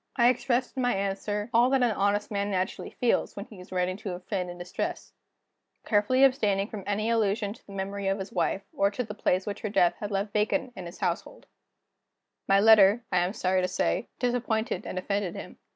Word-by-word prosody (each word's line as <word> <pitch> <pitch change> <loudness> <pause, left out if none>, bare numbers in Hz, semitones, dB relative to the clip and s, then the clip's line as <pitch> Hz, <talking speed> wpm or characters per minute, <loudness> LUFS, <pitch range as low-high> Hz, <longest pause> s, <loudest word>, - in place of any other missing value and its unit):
I 240 -1 +5
expressed 250 0 0
in 260 - -1
my 245 -3 +2
answer 205 +3 -2
all 240 +2 +5
that 265 -1 +3
an 240 - +3
honest 205 +1 0
man 200 0 -1
naturally 185 -1 -2
feels, 245 - 0
when 200 - -6
he 210 -5 -14
is 180 - -13
writing 185 0 -1
to 200 -3 -5
a - - -8
friend 180 -1 -3
in 175 - -8
distress; 175 +1 -5 0.7
carefully 225 +5 +3
abstaining 210 -7 +3
from 210 -3 -7
any 215 +3 0
allusion 210 -2 +1
to 230 - -20
the - - -12
memory 195 0 -3
of 195 +1 +1
his 190 0 -6
wife, 190 +2 0
or 200 - +2
to 230 +5 -3
the 210 -2 -7
place 190 -2 0
which 205 - -4
her 215 - -3
death 175 -4 +3
had 205 - -4
left 200 0 -2
vacant 220 +4 0
in 180 -2 -7
his 175 +5 -11
household. 180 0 -3 1.0
My 195 0 +5
letter, 215 +1 +6
I 180 - +3
am 180 +2 0
sorry 185 -3 +1
to 180 - +1
say, 180 - -1
disappointed 235 -5 -1
and - - -5
offended 200 -1 -2
him. - - -9
200 Hz, 215 wpm, -28 LUFS, 190-225 Hz, 1.0 s, letter